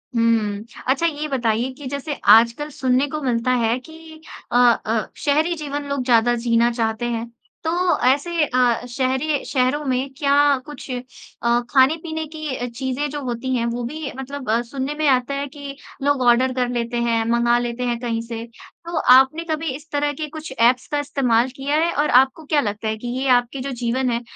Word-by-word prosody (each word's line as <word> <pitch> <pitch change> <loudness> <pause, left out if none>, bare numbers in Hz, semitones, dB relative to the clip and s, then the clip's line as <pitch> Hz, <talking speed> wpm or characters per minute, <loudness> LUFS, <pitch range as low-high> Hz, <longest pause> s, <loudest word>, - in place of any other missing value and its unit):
हुँ। 220 -3 +1 0.2
अच्छा 275 +6 +2
ये 305 -2 -1
बताइए 245 -2 0
कि 280 +1 -11
जैसे 280 +2 -4 0.2
आजकल 235 +7 +5
सुनने 265 -1 +1
को 305 +1 -4
मिलता 245 -1 0
है 225 +2 +2
कि 320 +2 -14 0.3
अ - - -2 0.3
अ, 220 0 0
शहरी 310 +4 +1
जीवन 290 -2 -4
लोग 280 -2 -1
ज़्यादा 240 -1 +4
जीना 235 0 +2
चाहते 230 0 -1
हैं। 230 0 -3 0.4
तो 320 - 0 0.4
ऐसे 310 +5 +2
अ, 245 -2 +1
शहरी 265 +4 -1
शहरों 265 +3 0
में 260 +1 -1
क्या 280 -2 +1 0.3
कुछ 295 -1 -10
अ, 245 -1 -3
खाने-पीने 315 +4 +2
की 310 -3 -5
अ, 245 - -3
चीज़ें 260 +4 -3
जो 290 0 -5
होती 250 +1 -2
हैं 235 - 0
वो 235 +1 -2
भी 295 +3 -5
मतलब 265 -1 -6
अ, 230 +2 +2
सुनने 265 +4 -4
में 305 -1 0
आता 255 0 +2
है 280 +1 -3
कि 280 0 -9 0.3
लोग 285 -2 +2
ऑर्डर 255 +2 +4
कर 250 -1 0
लेते 240 0 -2
हैं 230 -1 +1
मँगा 235 0 +3
लेते 240 +1 -3
हैं 240 -1 -1
कहीं 230 -2 -2
से। 230 -1 -6 0.4
तो 340 -1 -4 0.2
आपने 265 +6 +5
कभी 315 0 -1
इस 305 +3 -12
तरह 290 0 0
के 305 +2 -5
कुछ 310 -1 -8
ऐप्स 245 +2 +3
का 290 - +1
इस्तेमाल 260 -4 +1
किया 280 +2 -1
है? 335 +1 +2
और 295 +1 +1
आपको 265 +5 +3
क्या 295 -1 +2
लगता 215 +1 -3
है 220 0 -1
कि 240 - -7
ये 270 - -1
आपके 245 +2 +2
जो 275 +1 -4
जीवन 250 +1 -1
है 235 0 -1
260 Hz, 195 wpm, -21 LUFS, 235-290 Hz, 0.4 s, आजकल